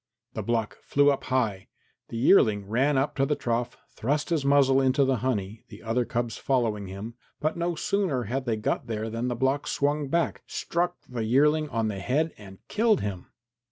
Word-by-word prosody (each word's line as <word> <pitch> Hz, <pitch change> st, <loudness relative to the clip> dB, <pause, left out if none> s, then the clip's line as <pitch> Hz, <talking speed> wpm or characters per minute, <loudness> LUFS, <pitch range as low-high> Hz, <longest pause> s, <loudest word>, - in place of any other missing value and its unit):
The -, -, -3 dB
block 115 Hz, -2 st, -2 dB
flew 145 Hz, 0 st, +3 dB
up 140 Hz, -, -3 dB
high. 115 Hz, -7 st, -1 dB, 0.4 s
The 115 Hz, -, -5 dB
yearling 110 Hz, -, +4 dB
ran 135 Hz, +6 st, +2 dB
up 135 Hz, +2 st, 0 dB
to 135 Hz, -, +3 dB
the 150 Hz, -, +1 dB
trough, 120 Hz, -1 st, -2 dB
thrust 145 Hz, +7 st, -1 dB
his 160 Hz, -4 st, +1 dB
muzzle 135 Hz, -1 st, +4 dB
into 135 Hz, +1 st, +3 dB
the 130 Hz, -1 st, +1 dB
honey, 110 Hz, -3 st, -2 dB
the -, -, -12 dB
other 115 Hz, +2 st, 0 dB
cubs 120 Hz, -1 st, -2 dB
followed 120 Hz, -5 st, +1 dB
him, 100 Hz, +5 st, -7 dB, 0.3 s
but 155 Hz, +1 st, 0 dB
no 170 Hz, 0 st, -1 dB
sooner 170 Hz, -8 st, 0 dB
had 130 Hz, +5 st, -3 dB
they 115 Hz, -3 st, 0 dB
got 105 Hz, -, -2 dB
there 110 Hz, 0 st, -3 dB
than 115 Hz, +2 st, -2 dB
the 120 Hz, -, -1 dB
block 135 Hz, +4 st, 0 dB
swung 145 Hz, +1 st, 0 dB
back, 170 Hz, +5 st, 0 dB
struck 175 Hz, +1 st, -1 dB
the 120 Hz, -3 st, -4 dB
yearling 150 Hz, +6 st, +3 dB
on 115 Hz, -3 st, 0 dB
the 100 Hz, -3 st, -3 dB
head 150 Hz, +10 st, 0 dB
and 95 Hz, -2 st, -14 dB
killed 215 Hz, -1 st, +2 dB
him. 95 Hz, -3 st, -4 dB
130 Hz, 195 wpm, -27 LUFS, 115-145 Hz, 0.4 s, yearling